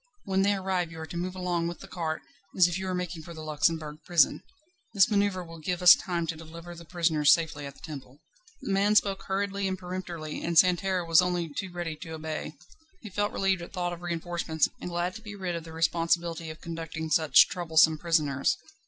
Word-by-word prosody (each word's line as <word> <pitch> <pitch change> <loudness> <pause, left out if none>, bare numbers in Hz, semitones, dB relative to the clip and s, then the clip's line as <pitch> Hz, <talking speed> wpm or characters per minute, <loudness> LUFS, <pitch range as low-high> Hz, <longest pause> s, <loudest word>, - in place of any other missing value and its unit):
When 190 -2 +1
they 200 +1 +3
arrive 185 -3 -1
you 165 - -9
are 160 - -5
to 165 - -9
move 180 +2 -3
along 175 -2 -1
with 170 - -6
the 195 - -10
cart, 165 -4 -3 0.3
as 180 -2 +7
if 175 - -3
you 190 - -4
were 185 - -1
making 180 -2 -4
for 170 +1 -10
the 155 - -8
Luxembourg 155 0 0
Prison. 170 -3 +3 0.5
This 195 +2 +5
manoeuvre 200 -3 +1
will 165 0 -11
give 180 +3 -3
us 180 - +11
time 175 -2 -2
to 165 - -3
deliver 165 +2 -10
the 170 0 -11
prisoners 155 -3 +3
safely 155 -3 +1
at 140 - -10
the - - -19
Temple." 140 -4 -9 0.5
The - - -3
man 200 +2 +3
spoke 195 -2 +3
hurriedly 195 0 -1
and 190 0 -2
peremptorily, 180 -4 -6
and 170 -1 -1
Santerne 180 0 +3
was 165 +1 +6
only 175 -3 -1
too 190 +4 -4
ready 175 -2 -4
to 160 0 -8
obey. 155 -1 -5 0.5
He 215 - -8
felt 205 +2 0
relieved 195 -2 +1
at 170 - -9
thought 175 -2 -2
of 175 - -9
reinforcements, 170 -2 -1
and - - -5
glad 175 +1 -1
to - - -14
be 210 -2 -8
rid 185 -3 -3
of 165 -1 -6
the 165 - -10
responsibility 165 0 0
of 155 +1 -9
conducting 165 -1 -5
such 155 -3 +6
troublesome 160 -3 +3
prisoners. 150 -5 +1
170 Hz, 215 wpm, -28 LUFS, 160-185 Hz, 0.5 s, us